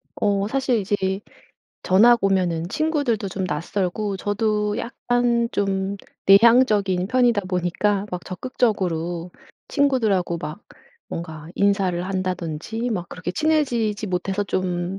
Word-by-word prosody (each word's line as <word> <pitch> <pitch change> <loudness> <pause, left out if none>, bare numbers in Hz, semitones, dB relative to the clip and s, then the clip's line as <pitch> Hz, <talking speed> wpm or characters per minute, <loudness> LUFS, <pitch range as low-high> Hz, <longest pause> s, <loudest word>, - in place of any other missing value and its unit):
어 200 -1 +1
사실 265 0 +1
이제 205 0 0 0.9
전학 235 +6 +5
오면은 180 -4 +1
친구들도 285 - 0
좀 190 +1 -3
낯설고 185 +5 -2
저도 210 +1 0
약간 240 0 0
좀 195 0 -1 0.3
내향적인 200 -3 +5
편이다 240 -2 +2
보니까 190 +3 0
막 180 -1 -5
적극적으로 180 -6 -2 0.4
친구들하고 220 - +1
막 150 +5 -7 0.5
뭔가 160 -2 -7
인사를 195 -3 +1
한다든지 185 +4 -3
막 180 -5 -3
그렇게 180 0 -5
친해지지 240 -8 0
못해서 190 +2 -1
좀 185 0 -2
200 Hz, 265 characters per minute, -22 LUFS, 180-230 Hz, 0.9 s, 전학